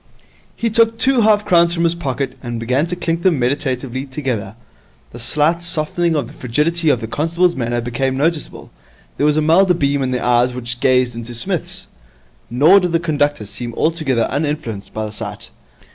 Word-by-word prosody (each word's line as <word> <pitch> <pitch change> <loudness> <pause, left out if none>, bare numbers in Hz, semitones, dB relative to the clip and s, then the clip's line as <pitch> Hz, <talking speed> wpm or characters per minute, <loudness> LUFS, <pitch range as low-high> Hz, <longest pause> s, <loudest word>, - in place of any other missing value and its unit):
He 230 -1 -2
took 225 +1 +3
two 260 0 +3
half 210 -1 +3
crowns 170 -1 +4
from 170 - 0
his 170 0 +3
pocket, 140 -5 -3
and 120 -2 -5
began 130 +7 0
to 180 - -3
clink 170 -1 -2
them 175 -3 +2
meditatively 130 0 -2
together. 130 -7 -4 0.6
A 120 - -9
slight 150 +7 +2
softening 170 0 +1
of 145 - 0
the - - -13
frigidity 155 +7 0
of 125 - +2
the 110 - -4
constable's 165 +8 0
manner 120 -1 -2
became 130 +3 -2
noticeable. 155 +2 -2 0.5
There 145 - +2
was 150 0 +2
a - - +3
milder 180 +4 +4
beam 140 -3 0
in 130 - -1
the 125 -1 -1
eyes 125 0 +2
which 120 -1 -4
gazed 125 -1 +2
into 115 +1 -7
Psmith's. 115 - -2 0.6
Nor 150 +11 +5
did 180 -2 -2
the 165 - +3
conductor 145 -7 -1
seem 115 +3 -6
altogether 155 -8 0
uninfluenced 145 -8 -3
by 110 0 -4
the 105 - -6
sight. 105 -1 -7
145 Hz, 185 wpm, -18 LUFS, 120-170 Hz, 0.6 s, Nor